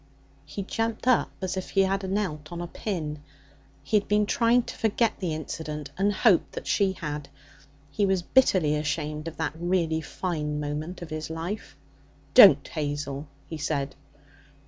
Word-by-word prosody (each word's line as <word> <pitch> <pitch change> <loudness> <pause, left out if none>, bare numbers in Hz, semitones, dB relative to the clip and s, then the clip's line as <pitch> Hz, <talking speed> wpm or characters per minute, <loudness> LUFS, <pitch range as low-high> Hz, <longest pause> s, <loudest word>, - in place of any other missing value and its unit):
He 195 +7 -5
jumped 225 +4 -2
up 255 -3 +4
as 185 0 -1
if 185 - -4
he 195 - +3
had 195 0 0
knelt 175 -7 -2
on 170 - -5
a 175 - -3
pin. 160 -5 -4 0.6
He 215 - +2
had 205 - -1
been 210 0 +3
trying 240 +1 +3
to - - -8
forget 220 0 +1
the 180 -4 -2
incident, 150 -2 -5
and 200 +2 +2
hoped 205 -3 +3
that - - -6
she 195 -2 +2
had. 150 -5 -5 0.6
He 200 +7 +1
was 190 -2 +1
bitterly 185 - +3
ashamed 150 +1 -2
of 165 - -7
that 160 -2 -1
really 165 -2 0
fine 150 -2 -3
moment 150 +5 -4
of 165 - -10
his 155 0 -4
life. 165 +1 -5 0.6
'Don't 150 -8 +9
Hazel!' 145 -1 -3 0.2
he 160 - -6
said. 140 -2 -1
165 Hz, 165 wpm, -27 LUFS, 150-195 Hz, 0.6 s, Don't